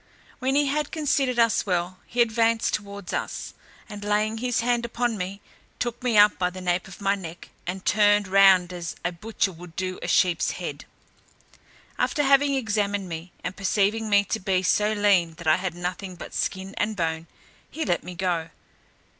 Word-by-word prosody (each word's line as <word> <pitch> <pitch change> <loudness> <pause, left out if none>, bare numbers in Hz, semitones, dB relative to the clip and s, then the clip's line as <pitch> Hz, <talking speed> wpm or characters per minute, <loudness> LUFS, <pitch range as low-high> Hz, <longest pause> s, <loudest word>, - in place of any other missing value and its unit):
When 265 +2 0
he 290 0 +4
had 290 +1 -1
considered 280 -5 0
us 230 -2 +3
well, 180 0 -1
he 240 0 +3
advanced 225 0 +1
towards 200 -2 -5
us, - - -4 0.3
and 205 -2 -8
laying 210 +2 0
his 245 -1 0
hand 240 0 +1
upon 235 0 -1
me, 195 +1 -5 0.4
took 240 -1 -3
me 245 -3 +1
up 210 0 +6
by 180 -1 +2
the 185 +1 -9
nape 180 0 -1
of 190 +1 -12
my 200 0 +2
neck, 175 -4 -8 0.2
and 185 +1 -4
turned 205 0 +4
round 190 -2 +5
as 170 -2 -5
a 175 - +1
butcher 200 +2 -2
would 175 -1 -12
do 185 0 -3
a - - -4
sheep's 175 -3 +2
head. - - -6 1.1
After 295 -3 +1
having 280 0 +4
examined 205 -5 -1
me, 165 +2 -6
and 180 +2 -4
perceiving 205 +3 +1
me 205 0 +5
to 220 - -2
be 185 -1 0
so 210 +3 +2
lean 195 -6 +3
that 170 0 -11
I 155 0 +5
had 180 -2 -3
nothing 180 +1 -5
but - - -10
skin 190 +1 -2
and 215 +1 0
bone, 165 -2 -2 0.4
he 320 - -4
let 175 -3 0
me 180 0 -8
go. 170 -3 -1
200 Hz, 185 wpm, -25 LUFS, 180-225 Hz, 1.1 s, up